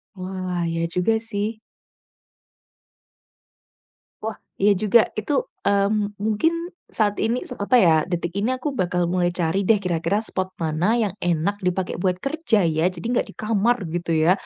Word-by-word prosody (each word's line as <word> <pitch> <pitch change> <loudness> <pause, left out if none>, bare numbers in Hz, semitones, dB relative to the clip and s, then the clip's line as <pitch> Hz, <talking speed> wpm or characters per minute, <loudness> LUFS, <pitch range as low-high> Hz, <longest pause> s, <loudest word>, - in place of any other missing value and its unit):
Wah, 185 -1 -4
iya 165 0 -1
juga 180 +5 +2
sih. 220 0 -3 2.6
Wah, 220 -1 -4 0.2
iya 205 +1 +5
juga. 215 +2 +5 0.2
Itu, 215 +7 -1 0.3
mmm, 205 +1 +1
mungkin 220 +10 +2 0.4
saat 205 -2 +2
ini 235 +3 0
se - - -5
apa 205 +5 +1
ya, 170 -4 +6
detik 175 -1 -3
ini 215 +5 +1
aku 260 +3 -2
bakal 180 -1 +1
mulai 175 -1 +1
cari 175 +3 0
deh 215 +1 +4
kira-kira 180 +2 0
spot 185 -3 -3
mana 160 +2 0 0.2
yang 200 -4 -2
enak 175 +3 +1
dipakai 180 0 -1
buat 180 0 0
kerja 275 -7 +1
ya, 160 +2 +1
jadi 170 -1 -9
enggak 245 - +1
di - - -10
kamar, 225 +2 +2
gitu 170 0 -3
ya. 160 +2 +4
195 Hz, 155 wpm, -23 LUFS, 175-215 Hz, 2.6 s, ya